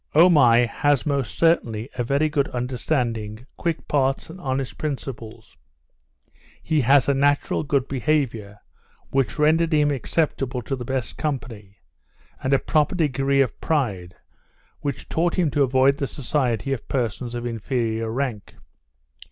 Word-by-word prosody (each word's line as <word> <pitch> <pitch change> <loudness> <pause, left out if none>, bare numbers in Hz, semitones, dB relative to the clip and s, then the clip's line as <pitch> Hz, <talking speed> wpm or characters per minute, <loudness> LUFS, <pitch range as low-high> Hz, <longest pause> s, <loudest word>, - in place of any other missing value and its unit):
Omai 135 -8 +6
has 145 +3 +1
most 140 -4 -1
certainly 120 -9 +2
a 120 - -1
very 140 +5 +1
good 145 -2 0
understanding, 120 -3 -2
quick 170 -2 -3
parts, 135 +1 0
and 185 +2 -11
honest 135 -2 -3
principles; 130 -6 -6 1.1
he 155 -2 +1
has 135 +2 +4
a 140 - +3
natural 140 +1 +1
good 140 -3 0
behaviour, 125 -7 -1 0.5
which 135 -5 0
rendered 160 +2 +3
him 150 -1 +3
acceptable 135 -2 -1
to 135 - -2
the 125 - -6
best 130 -1 -3
company; 115 -9 -5 0.6
and 130 - -1
a 135 - +5
proper 150 +5 +1
degree 140 -4 +2
of 130 -5 -2
pride, 105 - -1 0.6
which 140 -2 -4
taught 170 +1 0
him 170 -5 +2
to 145 - +1
avoid 135 +1 +3
the 140 - -1
society 130 -3 -1
of 130 - -6
persons 120 -1 -2
of 120 0 -4
inferior 115 -1 -2
rank. 120 -5 -4
135 Hz, 140 wpm, -23 LUFS, 120-145 Hz, 1.1 s, Omai